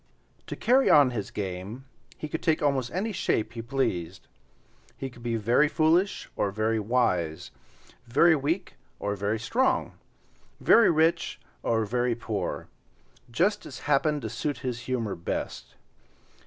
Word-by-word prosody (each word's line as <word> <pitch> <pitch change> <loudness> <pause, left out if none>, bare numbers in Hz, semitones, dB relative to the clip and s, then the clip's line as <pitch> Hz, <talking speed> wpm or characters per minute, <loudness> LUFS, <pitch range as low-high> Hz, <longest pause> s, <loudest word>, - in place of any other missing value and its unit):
To - - -5
carry 260 +3 +3
on 140 -4 +6
his 105 -5 -4
game 100 +6 -5 0.3
he 155 - -5
could 160 +2 -4
take 155 -2 +1
almost 135 -4 +1
any 200 +5 -2
shape 115 - -1
he 115 - -5
pleased. 115 -9 -2 0.7
He 135 -1 -5
could 120 - -15
be 115 -1 -2
very 120 +7 +3
foolish 165 +5 +2
or 100 - 0
very 110 +2 0
wise, 95 -8 0 0.6
very 160 +8 +5
weak 160 +6 -2 0.2
or 100 0 -2
very 100 +3 -1
strong, 240 - 0 0.7
very 230 - +6
rich 165 +1 +1 0.2
or 110 -1 +1
very 120 +2 0
poor—just 120 - -4
as 125 -3 -9
happened 145 0 +1
to 110 - -3
suit 145 -2 -2
his 125 -2 -2
humor 115 -6 -1
best. 85 - -5
125 Hz, 140 wpm, -27 LUFS, 110-155 Hz, 0.7 s, on